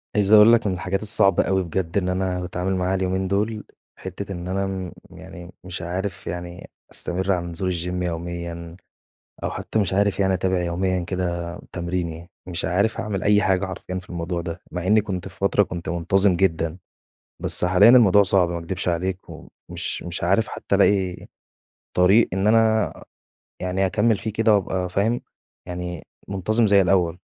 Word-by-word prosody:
عايز 105 0 +3
أقول 110 +2 +8
لك 115 -2 +3
من 95 - 0
الحاجات 95 +3 -2
الصعبة 100 -2 +4
أوي 95 -1 0
بجد 85 +1 -3
إن 90 -2 0
أنا 90 0 -1
باتعامل 90 +1 -2
معاها 90 +1 0
اليومين 95 0 -1
دول، 105 +2 -1 0.4
حِتّة 100 0 -7
إن 90 -1 -6
أنا 95 +1 -1
م 95 -2 -5 0.2
يعني 85 0 -11
مش 90 -1 -6
عارف 90 +2 -4
يعني 90 0 -7 0.2
أستمر 95 +2 -1
على 90 -2 0
نزول 85 +2 -3
الGym 90 +1 -2
يوميًا 85 0 -6 0.7
أو - - -1
حتى 110 - -3
مش 100 -2 0
عارف 100 0 +1
يعني 95 -1 +2
أتابع 95 0 0
يوميًا 90 +2 -1
كده 90 +1 -3 0.3
آآ - - -10
تمريني، 85 -1 -4 0.2
مش 90 -2 -2
عارف 100 +6 0
أعمل 105 -4 -3
أي 105 0 +4
حاجة 95 -2 +1
حرفيًأ 95 0 -6
في 90 - -16
الموضوع 85 0 -3
ده، 85 +1 -6
مع 90 0 -4
إنّي 105 +2 +5
كنت 95 -4 -5
في 95 - -13
فترة 100 +1 +2
كنت 85 -4 -6
منتظم 90 +3 +2
جدًا، 85 -2 0 0.6
بس - - +3
حاليًا 95 +5 +6
الموضوع 105 -5 +6
صعب 95 -2 +3
ما 85 0 -3
أكدبش 90 +3 -3
عليك، 90 +2 -1
ومش - - -6
مش 90 -1 -5
عارف 95 +5 +2
حتى - - -2
ألاقي 95 -2 +1 0.7
طريق 95 +6 +5
إن 95 +2 0
أنا 110 -1 +3 0.7
يعني 90 +1 0
أكمّل 105 +3 +2
فيه 110 - -4
كده 110 0 +3
وأبقى 95 -2 -1
فاهم، 110 +6 0 0.5
يعني 90 -2 -6 0.2
منتظم 110 +4 +1
زي 100 -1 +5
الأول، 90 -2 +2
95 Hz, 175 wpm, -23 LUFS, 90-100 Hz, 0.7 s, أقول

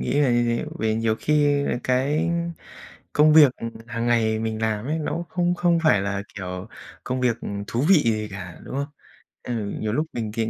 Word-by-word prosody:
nghĩ 145 - 0
là 135 -4 +3
như 120 0 +3
thế, 120 0 0
vì 110 0 +1
nhiều 110 0 0
khi, 145 -1 +2
à, - - 0
cái 140 +6 +1 0.8
công 150 +1 +5
việc, 145 -5 +8
ừm, 115 - -5 0.2
hằng 115 0 -2
ngày 110 -2 +2
mình 110 0 -3
làm 110 0 -1
ấy, 155 +3 -1
nó 155 - -2
cũng 170 +1 -3
không 175 -1 0
không 175 -1 +2
phải 105 -10 +5
là, 100 0 -2
kiểu, 90 +1 -6 0.4
công 130 0 -2
việc, 125 -3 +2
ừm, 100 0 -5
thú 120 +7 -1
vị 195 - +8
gì 110 -2 0
cả, 90 -3 -8
đúng - - -8
không? 140 +1 -1 0.6
Ừ, 125 - -4 0.3
nhiều 105 -1 -1
lúc 155 +5 0
mình 110 -3 -4
c - - -13
120 Hz, 215 wpm, -24 LUFS, 110-145 Hz, 0.8 s, việc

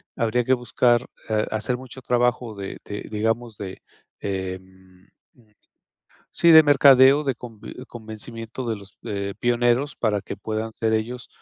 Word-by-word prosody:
habría 115 +1 0
que 130 - +3
buscar, 120 -1 +2 0.2
eh, 110 -1 +1
hacer 110 +3 -1
mucho 130 +1 -11
trabajo 125 -2 0
de 100 -1 -6
de, 105 0 -6
digamos, 115 +1 -1
de, 95 -2 -7 0.4
em 95 -1 -7 1.2
sí, 170 - +3
de 160 0 +10
mercadeo, 140 0 +6
de 135 -2 0
convi 115 -2 -10
convencimiento 115 +1 -8
de 110 - -1
los 100 -1 -14
de 100 -1 -4
pioneros 120 +4 +1
para 105 -3 0
que - - -7
puedan 110 +2 -4
ser 110 -1 0
ellos 115 +2 -3
115 Hz, 140 wpm, -23 LUFS, 105-125 Hz, 1.2 s, de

